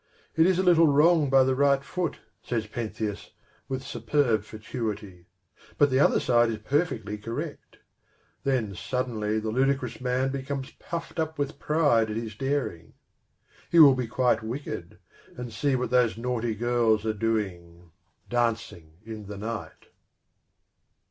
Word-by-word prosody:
" - - -35
It 160 +2 +5
is 185 -1 +3
a 185 - +2
little 170 -3 +6
wrong 150 +1 +4
by 135 0 +6
the 130 0 +2
right 140 0 +3
foot," 180 +2 -3 0.2
says 115 -3 -2
Pentheus, 110 -2 -5 0.4
with 130 0 -3
superb 120 -3 0
fatuity; 105 -5 -6 0.2
" - - -26
but 145 -2 +4
the 130 - +3
other - - +4
side 120 -1 +3
is 110 - -2
perfectly 110 - -1
correct." 115 +2 -6 0.7
Then 125 -7 0
suddenly 110 0 -2
the 110 0 -2
ludicrous 130 0 0
man 130 +1 0
becomes 135 0 -4
puffed 165 0 -6
up 160 -1 -2
with 145 0 -3
pride 145 -8 +2
at 105 - -3
his 115 -1 -4
daring. 135 - -3 0.8
He 170 - +2
will 145 -4 +10
be 130 -2 -2
quite 120 -1 +1
wicked, 110 - -6 0.4
and 120 -2 -6
see 135 +4 +1
what 125 -2 -2
those 125 -3 +3
naughty 120 -2 -2
girls 115 -1 +2
are 110 - +1
doing, 90 -6 -3 0.4
dancing 115 -9 -2
in 110 -2 -8
the 105 0 -7
night. 110 +2 -6
120 Hz, 150 wpm, -27 LUFS, 110-140 Hz, 0.8 s, will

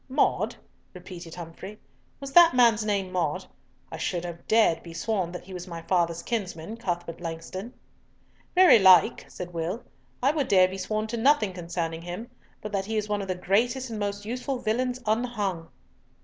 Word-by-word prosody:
"Maude," 260 - +1 0.4
repeated 175 -2 -9
Humfrey, 180 +5 -9 0.4
"Was 275 -1 -7
that 340 -4 +8
man's 230 -3 +5
name 200 -3 -1
Maude? 170 -5 -1 0.5
I - - -5
should 175 0 -2
have 170 -1 -8
dared 215 -7 +4
be 170 -1 -11
sworn 190 -4 -1
that 180 - -7
he 190 +1 -11
was 180 0 -7
my 165 -2 -7
father's 170 -2 0
kinsman, 200 -3 -4
Cuthbert 175 -6 -4
Langston." 175 +6 -6 0.8
"Very 360 -10 +8
like," 185 -4 +6
said 175 -1 -8
Will, 170 +7 -3 0.4
"I 275 - +5
would 300 -4 -1
dare 185 -2 +6
be 190 +1 -7
sworn 215 +3 -2
to 230 +2 -4
nothing 225 -5 +3
concerning 170 -2 -4
him, 175 +7 -7 0.3
but 210 - -5
that 195 -2 -1
he 220 +1 -2
is 210 0 -2
one 205 -1 0
of 195 - -5
the 185 - -1
greatest 235 +7 0
and 220 - -4
most 205 0 -3
useful 250 +4 -3
villains 245 +2 -1
unhung." 215 -7 -1
195 Hz, 175 wpm, -27 LUFS, 175-225 Hz, 0.8 s, that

